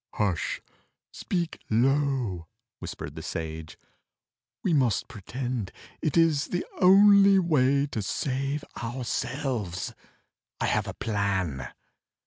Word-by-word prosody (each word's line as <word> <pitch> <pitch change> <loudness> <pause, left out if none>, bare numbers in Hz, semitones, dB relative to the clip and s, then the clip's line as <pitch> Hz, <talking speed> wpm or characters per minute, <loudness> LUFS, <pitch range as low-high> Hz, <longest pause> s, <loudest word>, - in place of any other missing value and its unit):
"Hush! 95 -7 -1 0.5
Speak 170 -3 -3
low!" 125 - +1 0.3
whispered - - -6
the - - -7
Sage. 80 -1 -5 0.9
"We 180 - +2
must 125 -8 +2
pretend: 120 0 -4 0.3
It 155 +1 0
is 160 -4 +3
the 180 - -2
only 200 +1 +7
way 140 -6 +3
to 125 -7 -4
save 140 +7 -2 0.2
ourselves. 120 - -3 0.7
I - - 0
have - - +1
a - - -5
plan." 95 - -1
130 Hz, 105 wpm, -27 LUFS, 100-150 Hz, 0.9 s, only